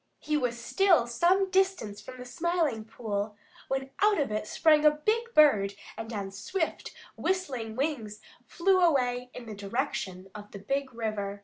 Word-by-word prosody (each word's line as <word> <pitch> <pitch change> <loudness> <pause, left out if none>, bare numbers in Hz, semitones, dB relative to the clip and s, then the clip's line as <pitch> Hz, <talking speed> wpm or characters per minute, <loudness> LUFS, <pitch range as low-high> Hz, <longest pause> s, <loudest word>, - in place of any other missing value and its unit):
He 305 - -2
was 245 -5 -1
still 350 +1 +3
some 360 +11 +2
distance 375 - +1
from 255 - -10
the 250 - -8
Smiling 315 -5 -1
Pool 210 -2 -4 0.3
when 270 0 -2
out 415 -3 +4
of 280 -7 0
it 215 0 -2
sprang 305 +2 +4
a 305 - +8
big 430 +11 -1
bird 205 -10 +5 0.2
and 225 +1 -7
on 200 -3 -4
swift, 320 - -3 0.2
whistling 260 -13 -2
wings 245 -7 -2 0.2
flew 370 +9 +2
away 250 -7 +2
in 250 - -8
the 220 - -7
direction 200 -3 -4
of 210 0 -10
the - - -6
Big 270 +6 -2
River. 215 -4 -3
250 Hz, 165 wpm, -29 LUFS, 215-320 Hz, 0.3 s, a